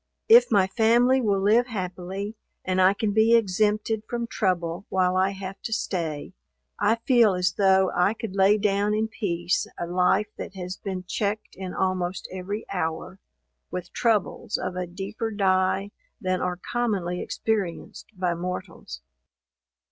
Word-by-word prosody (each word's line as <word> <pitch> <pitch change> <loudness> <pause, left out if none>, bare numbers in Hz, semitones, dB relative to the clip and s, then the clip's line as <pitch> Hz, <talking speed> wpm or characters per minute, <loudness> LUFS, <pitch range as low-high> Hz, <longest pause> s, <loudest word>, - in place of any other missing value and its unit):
If 470 +2 +7
my 200 -4 +4
family 240 +6 +3
will 200 -4 +1
live 220 +5 +3
happily, 190 -1 -5 0.3
and 185 0 +1
I 190 +2 +5
can 210 0 -1
be 220 +2 +5
exempted 215 +1 +1
from 235 -1 -2
trouble 180 -4 -1
while 185 -1 +1
I 190 +1 +3
have 195 0 -7
to - - -5
stay, 165 -8 -3 0.5
I 215 +3 +3
feel 235 -7 +5
as 180 0 +1
though 190 -1 +3
I 180 +5 +2
could 220 -4 -6
lay 195 +2 +5
down 205 0 +1
in 220 +1 0
peace 175 -5 -1
a - - -3
life 180 +4 +2
that 195 - -7
has 180 0 -5
been 190 -3 -5
checked 205 +3 -3
in 185 -1 -6
almost 185 -1 -1
every 190 +4 -5
hour, 180 +1 -3 0.5
with 180 -1 -6
troubles 220 -1 0
of 180 - -4
a 180 -1 -3
deeper 200 +5 -4
dye, 195 -1 +1 0.3
than 185 -4 -1
are 180 0 -1
commonly 195 -5 -2
experienced 205 -6 -3
by 180 -2 0
mortals. 170 - -6
195 Hz, 150 wpm, -25 LUFS, 180-215 Hz, 0.5 s, If